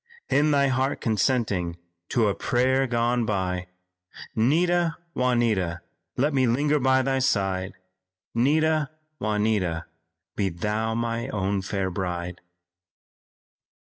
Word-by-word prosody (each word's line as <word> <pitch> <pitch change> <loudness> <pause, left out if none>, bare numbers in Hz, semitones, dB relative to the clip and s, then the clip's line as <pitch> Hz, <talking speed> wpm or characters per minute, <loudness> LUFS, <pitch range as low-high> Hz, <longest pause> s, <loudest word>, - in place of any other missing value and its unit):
In 150 +2 +4
thy 140 -2 +3
heart 130 +1 0
consenting 105 -6 0 0.3
to 115 -4 +2
a 100 - +2
prayer 130 +4 +1
gone 120 0 +1
by, 90 -4 -1 0.7
'Nita, 165 +7 +2 0.2
Juanita, 115 -9 +1 0.4
let 145 +4 +2
me 130 -2 +3
linger 145 +5 +2
by 130 0 +3
thy 135 0 +1
side; 95 -6 0 0.6
'Nita, 155 +4 +2 0.3
Juanita, 105 -6 0 0.5
be 100 -2 0
thou 105 +6 -2
my 115 0 -2
own 100 -1 -1
fair 95 -1 -2
bride." 90 -1 -4
115 Hz, 110 wpm, -25 LUFS, 95-130 Hz, 0.7 s, In